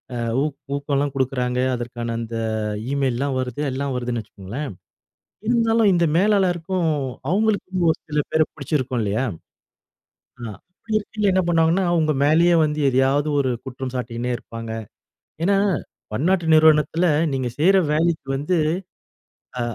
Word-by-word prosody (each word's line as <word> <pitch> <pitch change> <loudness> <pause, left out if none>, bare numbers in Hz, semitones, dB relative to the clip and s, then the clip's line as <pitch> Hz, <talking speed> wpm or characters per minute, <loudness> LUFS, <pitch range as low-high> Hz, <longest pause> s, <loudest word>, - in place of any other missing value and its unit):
அ - - -3 0.3
உ - - +1 0.3
ஊக்கம்லாம் 140 0 -1
குடுக்குறாங்க. 125 -2 0 0.2
அதற்கான 120 -1 -4
அந்த 115 0 -5 0.6
ஈமெயில்லலாம் 135 -1 0
வருது 130 +2 -3
எல்லாம் 140 +1 -2
வருதுன்னு 120 -2 -2
வச்சுக்கோங்களேன். 110 +7 -7 0.8
இருந்தாலும் 230 -2 +3
இந்த 170 -1 +3
மேலாளருக்கும் 185 -3 +2 0.4
அவங்களுக்கு 190 -2 +1
ஒரு 160 - -4
சில 150 - 0
பேர 160 - +3
பிடிச்சிருக்கும் 130 -4 -2
இல்லையா? 105 +5 0 1.2
ஆ - - -4 0.3
அப்பிடி 215 +2 -2
இருக்கையில 210 -1 -1
என்ன 185 0 +3
பண்ணுவாங்கன்னா, 165 +2 +3
உங்க 155 -1 +2
மேலேயே 170 +4 +4
வந்து 150 0 -1
எதையாவது 135 +3 +2
ஒரு 130 -2 +1
குற்றம் 130 -1 -6
சாட்டினே 120 0 -3
இருப்பாங்க. 115 -1 -8 0.7
ஏன்னா, 195 +2 +3 0.5
பன்னாட்டு 170 - +1
நிறுவனத்தில, 155 +2 +4 0.3
நீங்க 130 -2 -1
செய்ற 190 +6 +5 0.2
வேலைக்கு 160 -1 +1
வந்து, 150 +6 0 1.0
அ - - 0
150 Hz, 125 wpm, -22 LUFS, 125-175 Hz, 1.2 s, செய்ற